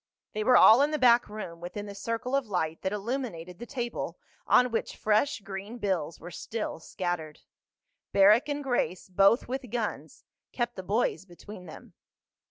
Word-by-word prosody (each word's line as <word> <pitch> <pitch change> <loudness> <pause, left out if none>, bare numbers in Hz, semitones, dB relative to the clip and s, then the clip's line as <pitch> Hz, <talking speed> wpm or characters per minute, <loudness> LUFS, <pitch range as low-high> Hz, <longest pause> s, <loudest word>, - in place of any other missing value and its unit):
They 215 -1 -2
were 250 +3 +6
all 230 +5 +8
in 290 - +3
the 305 - -1
back 245 -4 +5
room, 180 -6 -7
within 190 +4 -6
the 200 - -8
circle 230 +5 -3
of 275 -4 0
light 165 -5 -2
that 190 - -1
illuminated 205 -6 -4
the 240 - -8
table 240 -4 -4 0.3
on 250 0 +5
which 225 - -2
fresh 215 +4 +1
green 200 +4 -7
bills 185 -7 -2
were 175 - -9
still 215 +2 -5
scattered. 165 -3 -4 0.7
Barrack 215 +9 +5
and 290 0 -2
Grace, 245 -8 -1
both 195 +5 +4
with 255 0 -4
guns, 230 -1 -4 0.3
kept 240 -1 -2
the 190 - -5
boys 190 -2 0
between 185 +1 -12
them. 155 - -12
210 Hz, 170 wpm, -28 LUFS, 185-245 Hz, 0.7 s, all